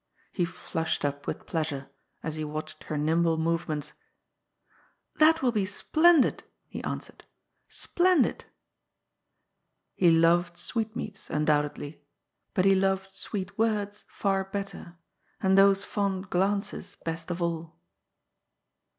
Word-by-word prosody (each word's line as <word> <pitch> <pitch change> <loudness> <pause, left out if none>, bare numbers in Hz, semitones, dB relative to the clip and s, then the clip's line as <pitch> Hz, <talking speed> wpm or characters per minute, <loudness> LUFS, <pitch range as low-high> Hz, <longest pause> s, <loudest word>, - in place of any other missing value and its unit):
He 180 - 0
flushed 160 -2 -3
up 145 0 -3
with - - -4
pleasure, 150 -4 -3 0.3
as 160 - -3
he 155 0 -3
watched 155 +1 -6
her 155 - -3
nimble 160 +2 +2
movements, 160 -2 -1 0.6
" - - -37
That 320 0 +5
will 250 - +4
be 205 -4 0
splendid 315 - +4
I - - -31 0.2
he - - -6
answered - - -6 0.2
— - - -53
" - - -46
splendid! 355 -6 +2 0.8
" - - -52
He 175 - +7
loved 170 +1 +4
sweetmeats, 220 0 -3
undoubt 150 -1 +1
edly, 145 +1 -8 0.6
but 185 - +3
he 195 - +6
loved 190 0 +1
sweet 195 0 -5
words 210 -2 0
far 195 -1 0
better, 195 -3 -6 0.4
and 190 0 +3
those 195 0 +6
fond 200 -2 -2
glances 200 +3 -1
best 165 +1 -4
of 175 0 -3
all. 165 -1 -3
185 Hz, 135 wpm, -28 LUFS, 160-200 Hz, 0.8 s, He